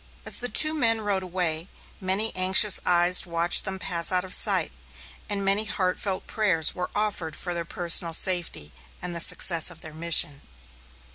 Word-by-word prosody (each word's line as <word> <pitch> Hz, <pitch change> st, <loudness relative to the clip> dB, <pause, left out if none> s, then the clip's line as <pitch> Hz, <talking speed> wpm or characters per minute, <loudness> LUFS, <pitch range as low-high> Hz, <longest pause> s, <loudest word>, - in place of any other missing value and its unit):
As -, -, 0 dB
the 245 Hz, -, -5 dB
two 310 Hz, +4 st, +5 dB
men 230 Hz, -7 st, 0 dB
rode 200 Hz, -2 st, -3 dB
away, 175 Hz, -2 st, -4 dB, 0.3 s
many 195 Hz, +4 st, -1 dB
anxious 190 Hz, +2 st, +4 dB
eyes 175 Hz, +1 st, +3 dB
watched 170 Hz, +1 st, +3 dB
them 190 Hz, 0 st, -6 dB
pass 175 Hz, -2 st, -1 dB
out 180 Hz, 0 st, -2 dB
of 185 Hz, -, -4 dB
sight, -, -, +4 dB, 0.6 s
and 200 Hz, -1 st, -3 dB
many 200 Hz, +2 st, 0 dB
heartfelt 190 Hz, -1 st, -4 dB
prayers 185 Hz, -8 st, -2 dB
were 180 Hz, 0 st, -6 dB
offered 205 Hz, -6 st, -3 dB
for 180 Hz, -, -6 dB
their 170 Hz, -1 st, -6 dB
personal 170 Hz, 0 st, 0 dB
safety, 175 Hz, -, -2 dB, 0.3 s
and 175 Hz, -1 st, -7 dB
the 170 Hz, -, -2 dB
success 170 Hz, 0 st, +4 dB
of 175 Hz, -2 st, -15 dB
their 155 Hz, -, -12 dB
mission. 155 Hz, -3 st, -1 dB
185 Hz, 165 wpm, -23 LUFS, 170-195 Hz, 0.6 s, two